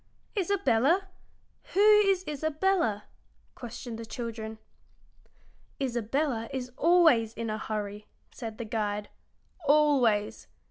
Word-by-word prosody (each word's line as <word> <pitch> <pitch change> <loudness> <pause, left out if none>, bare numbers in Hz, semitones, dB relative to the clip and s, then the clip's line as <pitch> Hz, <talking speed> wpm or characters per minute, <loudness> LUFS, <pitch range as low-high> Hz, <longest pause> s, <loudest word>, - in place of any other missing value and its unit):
"Isabella! 360 - +2 0.7
Who - - +2
is 410 -3 +5
Isabella?" 305 - 0 0.5
questioned 240 -1 -8
the 230 - -6
children. 225 -1 -6 1.2
"Isabella 245 -1 -1
is 250 -1 -4
always 315 -10 +4
in 230 -1 -3
a 215 - -3
hurry," 210 -1 -5 0.2
said 225 -3 -7
the 235 - -5
guide 210 -2 -2 0.5
"always. 275 -8 +2
240 Hz, 95 wpm, -28 LUFS, 220-315 Hz, 1.2 s, is